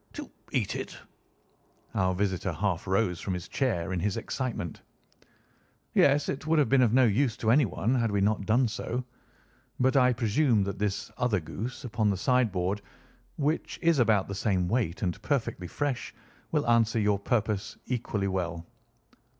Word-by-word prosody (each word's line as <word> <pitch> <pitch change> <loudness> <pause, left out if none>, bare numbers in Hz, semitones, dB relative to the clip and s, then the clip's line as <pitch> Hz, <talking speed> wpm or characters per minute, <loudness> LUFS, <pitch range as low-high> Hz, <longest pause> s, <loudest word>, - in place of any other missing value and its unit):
"To - - -8 0.2
eat - - 0
it!" - - -5 1.0
Our 95 -1 +1
visitor 95 -1 -1
half 90 +1 -1
rose 95 -2 +1
from 95 - -2
his 90 0 -6
chair 100 -9 -1
in 90 - -1
his 100 +3 -1
excitement. 115 - -4 1.1
"Yes, 140 +1 +4
it 140 +3 -4
would 165 0 +3
have 145 -6 +3
been 135 -1 +5
of 120 -4 +4
no 130 +2 +5
use 115 +2 +1
to 110 - +1
anyone 120 -3 +2
had 115 -3 +1
we 100 -1 0
not 100 0 +1
done 120 +3 +3
so. 120 +3 -3 0.8
But 130 +2 +3
I 125 -2 +5
presume 115 -1 +2
that 100 0 -4
this 100 -1 -2
other 120 -5 +2
goose 110 - -6
upon 110 -3 0
the 100 - 0
sideboard, 100 -4 +1 0.6
which 150 +2 -1
is 165 -4 +4
about 110 -5 +3
the 100 - -5
same 95 -2 0
weight 100 -4 -1
and 90 -3 -2
perfectly 120 - -2
fresh, 135 - -3 0.4
will - - 0
answer 115 -1 +3
your 105 -2 +2
purpose 105 -2 -1
equally 110 -5 -2
well?" 85 -3 -3
110 Hz, 165 wpm, -28 LUFS, 95-125 Hz, 1.1 s, been